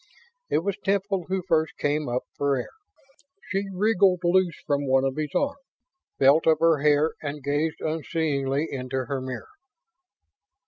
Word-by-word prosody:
It 160 - +1
was 200 0 -2
Temple 195 -2 0
who 190 -1 -1
first 160 -2 +1
came 145 -1 -1
up 125 +1 -1
for 140 -1 +1
air. 125 - -5 0.8
She 195 0 -1
wriggled 190 -2 +3
loose 175 -1 +2
from 145 -1 0
one 130 0 +3
of 135 -1 -1
his 155 -1 -2
arms, 280 0 0 0.6
felt 140 +5 +4
of 160 -1 +5
her 165 -2 +4
hair 150 +1 +3
and 145 -1 -5
gazed 145 +3 -1
unseeingly 155 -2 -1
into 130 -1 -3
her 135 +1 -3
mirror. 130 -3 -6
155 Hz, 150 wpm, -25 LUFS, 140-180 Hz, 0.8 s, of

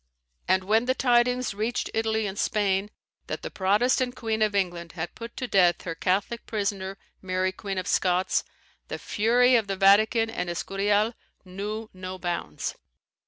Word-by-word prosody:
And 185 +1 +3
when 220 +5 +2
the 260 +1 +1
tidings 245 -2 +2
reached 220 +4 -2
Italy 220 -1 0
and 195 -1 -4
Spain 200 -1 +1 0.4
that - - -5
the - - -5
Protestant 245 +6 +2
Queen 220 -2 -2
of 210 -1 +2
England 175 -3 -1
had 165 0 -5
put 230 0 -9
to 255 - -3
death 180 -5 +3
her 170 - -3
Catholic 195 +7 -1
prisoner, 195 -2 -2 0.2
Mary 185 0 0
Queen 195 0 -5
of 185 - -2
Scots, 180 0 +1 0.4
the - - -4
fury 245 +4 +3
of 225 -3 +2
the 195 - -1
Vatican 215 +4 +5
and 180 -5 -3
Escurial 205 +5 +1 0.3
knew 205 +4 -5
no 185 0 -7
bounds. 175 -2 -3
205 Hz, 160 wpm, -26 LUFS, 185-225 Hz, 0.4 s, Vatican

